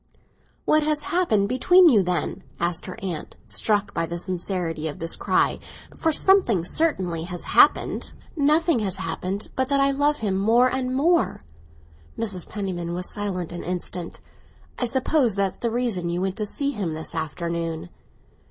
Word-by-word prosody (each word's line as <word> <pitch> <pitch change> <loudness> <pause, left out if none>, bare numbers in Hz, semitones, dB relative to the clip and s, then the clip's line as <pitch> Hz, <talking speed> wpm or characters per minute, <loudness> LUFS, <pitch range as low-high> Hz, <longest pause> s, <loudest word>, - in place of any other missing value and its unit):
"What 310 - +4
has 300 0 0
happened 345 - +1
between 355 - +5
you, 230 -10 +6
then?" 180 -1 -2 0.2
asked 170 0 -1
her 185 - -7
aunt, 175 -5 -5
struck 205 -2 0
by 165 - -1
the 170 - -4
sincerity 175 -3 -2
of 145 - -5
this 165 0 -1
cry. - - +1 0.4
"For 325 - +1
something 300 - +3
certainly 180 - 0
has 175 -1 -6
happened." - - +3 0.2
"Nothing 305 -1 +3
has 195 -4 -1
happened 185 +5 -4
but 260 0 0
that 280 0 +2
I 275 0 +4
love 290 +2 +1
him 195 -3 -1
more 235 +5 +4
and 255 -1 -1
more!" 335 +5 +2 0.8
Mrs. 205 -6 -3
Penniman 175 -4 -4
was 180 +1 -3
silent 190 -5 -3
an 175 - -6
instant. 180 -1 -5 0.6
"I 250 - +1
suppose 260 -2 +2
that's 195 -1 -1
the 235 - 0
reason 225 -7 0
you 170 +1 -1
went 190 0 -2
to 210 - -1
see 280 +6 -1
him 195 - -3
this 160 +1 -5
afternoon." 165 - -3
200 Hz, 160 wpm, -24 LUFS, 175-265 Hz, 0.8 s, you